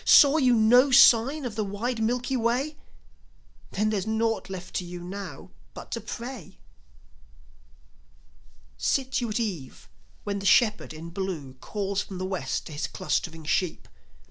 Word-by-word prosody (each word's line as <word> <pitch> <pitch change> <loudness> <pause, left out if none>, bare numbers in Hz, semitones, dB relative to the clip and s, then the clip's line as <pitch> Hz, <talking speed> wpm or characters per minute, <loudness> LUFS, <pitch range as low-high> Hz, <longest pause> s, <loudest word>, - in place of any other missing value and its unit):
Saw 285 +1 +7
you 255 -5 +4
no 245 +5 +5
sign 265 +2 +6
on 240 - -4
the 215 0 -1
wide 225 +4 -3
Milky 245 +3 0
Way? 250 +6 0 0.9
Then 215 +2 0
there's 205 -1 -2
naught 220 -2 0
left 185 -2 -7
to - - -2
you 175 0 -7
now 195 +3 -8 0.2
but - - -10
to - - -3
pray. 240 - -8 2.2
Sit 265 -1 0
you 240 - -2
at 215 - -1
eve 180 - -5 0.4
when 200 -1 -3
the 195 - -7
Shepherd 215 -1 +3
in 160 +2 -9
Blue 170 -8 -4
Calls 200 +8 -3
from 195 -2 -8
the 185 - -3
West 185 -8 -3
to - - -9
his 145 -2 -2
clustering 165 0 -3
sheep. 175 +3 -1
210 Hz, 150 wpm, -26 LUFS, 185-245 Hz, 2.2 s, Saw